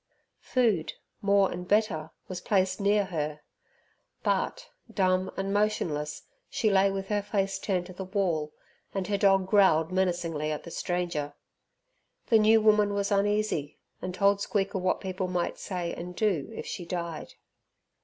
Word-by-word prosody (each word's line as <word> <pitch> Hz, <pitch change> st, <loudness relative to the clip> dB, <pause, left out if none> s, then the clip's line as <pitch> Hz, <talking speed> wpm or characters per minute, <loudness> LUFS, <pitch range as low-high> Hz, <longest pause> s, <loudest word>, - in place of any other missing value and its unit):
Food, 220 Hz, -11 st, +1 dB, 0.3 s
more 200 Hz, -1 st, +3 dB
and 180 Hz, 0 st, -6 dB
better, 200 Hz, -7 st, +1 dB, 0.2 s
was 185 Hz, -1 st, -5 dB
placed 190 Hz, -1 st, +1 dB
near 205 Hz, 0 st, +3 dB
her 150 Hz, -4 st, -3 dB, 0.8 s
but, -, -, -1 dB, 0.2 s
dumb 185 Hz, -1 st, +1 dB
and 195 Hz, +1 st, -1 dB
motionless, 165 Hz, -8 st, -1 dB, 0.3 s
she 215 Hz, -, +1 dB
lay 195 Hz, 0 st, +4 dB
with 195 Hz, 0 st, -4 dB
her 205 Hz, -1 st, +1 dB
face 195 Hz, -1 st, -1 dB
turned 185 Hz, -3 st, -1 dB
to 185 Hz, -, -10 dB
the 190 Hz, -, -6 dB
wall, 180 Hz, -6 st, -1 dB, 0.4 s
and 195 Hz, -1 st, -1 dB
her 200 Hz, +2 st, 0 dB
dog 195 Hz, -1 st, +4 dB
growled 190 Hz, -5 st, +4 dB
menacingly 175 Hz, -5 st, 0 dB
at 150 Hz, -, -4 dB
the 170 Hz, -, -9 dB
stranger. 170 Hz, -6 st, -2 dB, 0.9 s
The 225 Hz, -, +6 dB
new 220 Hz, +1 st, +6 dB
woman 210 Hz, -1 st, +4 dB
was 200 Hz, 0 st, -1 dB
uneasy, 200 Hz, -7 st, 0 dB, 0.2 s
and 185 Hz, -, -3 dB
told 200 Hz, +2 st, +2 dB
Squeaker 200 Hz, -1 st, -1 dB
what 185 Hz, 0 st, 0 dB
people 185 Hz, -1 st, -3 dB
might 180 Hz, -1 st, -2 dB
say 175 Hz, -3 st, -3 dB
and 180 Hz, +1 st, -7 dB
do 190 Hz, -10 st, 0 dB
if -, -, -6 dB
she 185 Hz, -, -5 dB
died. 170 Hz, -2 st, -5 dB
190 Hz, 155 wpm, -28 LUFS, 175-200 Hz, 0.9 s, The